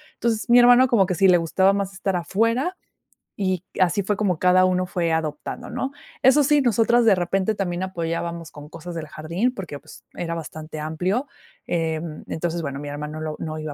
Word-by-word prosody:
Entonces, 230 -1 -1
mi 240 - +7
hermano, 245 +1 +7
como 215 -6 +4
que 185 - -1
sí 195 +3 +4
le 180 -1 +6
gustaba 190 +4 +2
más 200 -1 -2
estar 190 -1 -2
afuera, 230 - 0 0.7
y 185 -2 0 0.2
así 185 +3 +3
fue 205 +1 -1
como 185 -6 0
cada 185 0 +5
uno 185 0 +2
fue 175 -2 -1
adoptando, 160 +9 -3
¿no?, 270 +1 -3 0.3
eso 270 +3 +6
sí, 295 +1 +4
nosotras 235 0 +3
de 215 -3 +6
repente 190 +4 0
también 185 -2 -2
apoyábamos 170 -2 -4
con 145 0 -11
cosas 170 +2 -8
del 155 -1 -4
jardín, 170 - -2
porque, 165 -7 -6
pues, - - -15
era 170 -1 -3
bastante 155 -1 -7
amplio. 180 - -1 0.4
Em, 160 -1 -3
entonces, 170 0 -3
bueno, 140 -1 -4
mi 145 - -6
hermano 150 +2 -6
lo 155 -1 -4
no 155 -1 -5
iba 155 -1 -5
180 Hz, 190 wpm, -23 LUFS, 160-210 Hz, 0.7 s, mi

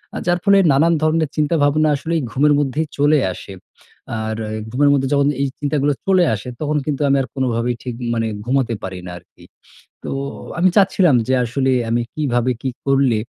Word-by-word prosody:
আ - - -3
যার 175 0 +2
ফলে 200 -1 +5
নানান 160 +5 +3
ধরনের 155 -1 +1
চিন্তাভাবনা 155 0 +2
আসলেই 160 +3 -2
ঘুমের 145 +4 +3
মধ্যেই 145 +2 -1
চলে 145 +1 +4
আসে। 95 - -10 0.6
আর 110 0 -3 0.4
ঘুমের 145 +4 +3
মধ্যে 135 -1 +1
যখন 140 0 +3
এই 140 - +1
চিন্তাগুলো 145 -1 0
চলে 190 -2 +4
আসে, 105 - -9
তখন 150 0 0
কিন্তু 150 -1 -2
আমি 140 - +3
আর 130 - -4
কোনভাবেই 120 -2 -1
ঠিক 125 -2 -5 0.2
মানে 115 -1 -1 0.2
ঘুমোতে 130 -2 0
পারি 95 -1 -5
না - - -6
আরকি। 85 - -19 0.6
তো - - -5 0.5
আমি 185 +1 +4
চাচ্ছিলাম 190 -6 +4
যে 130 - +1
আসলে 130 +3 0 0.2
আমি 120 +1 +1
কিভাবে 130 -4 0
কি 135 - -2 0.2
করলে 135 -5 +3
140 Hz, 175 wpm, -19 LUFS, 125-155 Hz, 0.6 s, ফলে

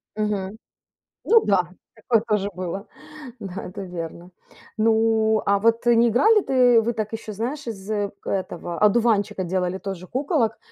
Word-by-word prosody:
Мгм. 210 -1 -2 0.7
Ну 455 -1 +4
да, 180 -4 +2 0.3
такое 225 0 +1
тоже 205 -1 0
было. 185 +2 -5 0.5
Да, 195 0 -6
это 195 +2 -7
верно. 175 0 -7 0.5
Ну, 220 0 +2
а 200 0 +3
вот 230 +2 +2
не 235 0 +5
играли 420 - +4
ты 250 -5 +4
вы 235 +2 -1
так 215 -1 -4
еще, 220 -1 -6
знаешь, 245 +6 -4
из 200 -3 -7 0.4
этого, 175 -3 -4
одуванчика, 210 -2 +2
делали 180 +1 -1
тоже 190 -2 -7
куколок 260 - 0
215 Hz, 140 wpm, -23 LUFS, 190-230 Hz, 0.7 s, не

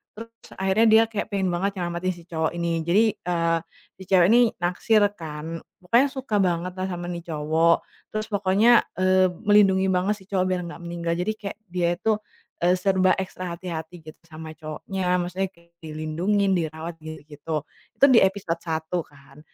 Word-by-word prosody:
Terus 230 +1 -12
akhirnya 195 +4 +3
dia 220 +1 +7
kayak 210 - -3
pengen 195 -2 0
banget 195 +2 -2
nyelamatin 175 +1 -2
si 170 - -14
cowok 160 -2 -1
ini. 170 -1 -1
Jadi 200 +6 +4 0.2
eee 170 -1 0 0.4
si - - -8
cewek 180 -2 +5
ini 240 - +6 0.2
naksir 205 +4 +2
kan. 160 +1 -6 0.2
Pokoknya 235 +9 +3
suka 265 -6 -4
banget 180 0 -1
lah 185 0 -3
sama 175 0 -5
nih 175 -1 -5
cowok. 160 +2 +3 0.4
Terus 215 0 -3
pokoknya 205 +3 +4 0.2
eee 185 0 +4 0.2
melindungi 195 -2 +5
banget 190 +3 +1
si 190 - -16
cowok 185 -2 0
biar 180 -1 0
nggak 170 - -9
meninggal. 170 0 -3
Jadi 180 +5 -1
kayak 200 -1 -6
dia 175 -1 +1
tuh 220 -1 +2 0.4
e 175 +1 +3
serba 185 0 +2
ekstra 185 -2 -5
hati-hati 170 -1 -7
gitu - - -29
sama 160 0 -9
cowoknya. 180 +4 -3
Maksudnya 185 +2 -2
kayak 170 0 -25
dilindungin, 165 +6 -1
dirawat 160 0 -4
gi 155 -1 -9
gitu. 150 0 -4 0.4
Tuh 280 - +8
di 230 - +8
episode 190 -4 -1
1 160 +1 -3
kan. 140 0 -19
180 Hz, 170 wpm, -24 LUFS, 165-195 Hz, 0.4 s, Tuh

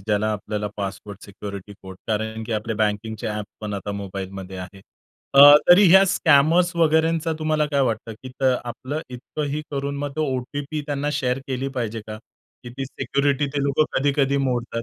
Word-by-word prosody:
ज्याला 105 +2 0
आपल्याला 105 0 -4
password, 100 0 -6
security 100 0 -8
code. 95 -1 -10
कारण 110 +1 -2
की 115 - -5
आपल्या 110 0 -2
बँकिंगचे 110 0 -2
ॲप 105 0 -3 0.2
पण 105 -1 -4
आता 100 +1 -4
मोबाईलमध्ये 95 -1 -6
आहेत. 95 +1 -9 0.5
अ, 140 - +8 0.3
तरी 180 +1 +7
या 190 0 +8
स्कॅमर्स 170 +1 +3
वगैरेंचा 160 0 +2
तुम्हाला 155 -1 +1
काय 145 -1 0
वाटतं, 115 -3 -1
की 130 - -7
तर 130 -2 +3
आपलं 130 +5 -5
इतकंही 145 +4 -4
करून 140 0 -3
मग 145 0 -4
तो 155 - +1
ओ-टी-पी 145 +4 -4
त्यांना 145 0 -2
शेअर 130 -3 0
केली 130 +1 -2
पाहिजे 115 -1 -3
का? 110 0 -7 0.5
की 120 - -8
ती 135 - -2
सिक्युरिटी 140 +1 0
ते 140 - 0
लोकं 140 +2 +2
कधी-कधी 140 0 +1
मोडतात. 120 -2 -2
125 Hz, 170 wpm, -23 LUFS, 105-145 Hz, 0.5 s, अ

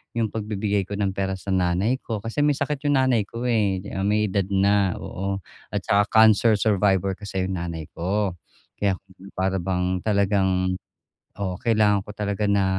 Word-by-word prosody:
yung 115 -3 0
pagbibigay 105 -2 -1
ko 100 - -4
ng 100 -1 0
pera 95 0 -2
sa 95 +1 -6
nanay 95 +7 +1
ko. 110 -6 -5
Kasi 115 +6 -4
may 145 0 +3
sakit 145 +1 -2
yung 145 - +3
nanay 125 -6 +2
ko, 115 +3 -6
eh. 105 -6 +1
Ah, 95 - -3
may 105 -1 +1
edad 100 -2 0
na, 100 -1 +2
oo. 95 +1 -4 0.3
At - - -3
tsaka 100 +1 +3
cancer 110 0 +5
survivor 100 -2 +2
kasi 100 -3 -3
yung 95 -2 -3
nanay 85 -2 -4
ko. 95 +3 -1 0.5
Kaya 100 -2 +2 0.4
para 95 0 0
bang 90 0 -1
talagang 95 -3 +1 0.7
oo, 95 -2 -2
kailangan 105 -4 +3
ko 105 - -9
talaga 105 0 -3
na, 100 -1 +3
100 Hz, 175 wpm, -24 LUFS, 95-105 Hz, 0.7 s, cancer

